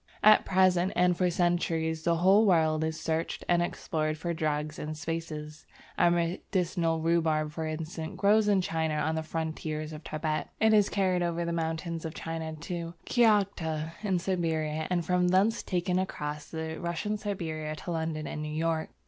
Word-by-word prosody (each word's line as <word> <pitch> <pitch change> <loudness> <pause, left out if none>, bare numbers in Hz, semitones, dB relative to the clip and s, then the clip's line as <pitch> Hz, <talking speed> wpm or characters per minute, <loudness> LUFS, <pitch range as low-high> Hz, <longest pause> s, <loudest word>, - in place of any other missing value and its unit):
At 215 0 +7
present, 185 -1 +3
and 180 0 +3
for 180 +1 +2
centuries 170 -2 0
past, - - -15
the 170 - +3
whole 190 +5 +5
world 160 -3 +3
is 160 0 -2
searched 160 0 -2
and 175 -1 +3
explored 155 -2 -2
for 170 +2 -2
drugs 155 -2 -2
and 155 0 -5
spices. 155 -1 -5 0.3
Our 175 - +4
medicinal 170 -1 0
rhubarb 160 -2 +1
for 160 +1 -4
instance, 160 +1 -5
grows 210 +1 +4
in 200 -2 +4
China 160 -3 -1
on 150 +1 0
the 160 - -1
frontiers 155 -1 -4
of 155 +1 -9
Tibet; 155 0 -2
it 220 0 +4
is 210 -2 +5
carried 185 -3 +1
over 170 0 -1
the 170 - -2
mountains 165 0 -2
of 160 -1 -5
China 160 -1 -4
to 170 +2 -5
Kiaghta 195 -9 +2
in 195 -4 +1
Siberia, 160 -4 -1
and 175 -2 0
from 180 +1 +2
thence 195 +5 +3
taken 180 -1 -1
right 185 - +2
across 150 0 -5
Russian 170 +6 -3
Siberia 160 -7 -3
to 175 - -6
London 160 -2 -2
and 150 - -5
New 150 - -4
York. 160 +1 -1
165 Hz, 175 wpm, -29 LUFS, 155-180 Hz, 0.3 s, At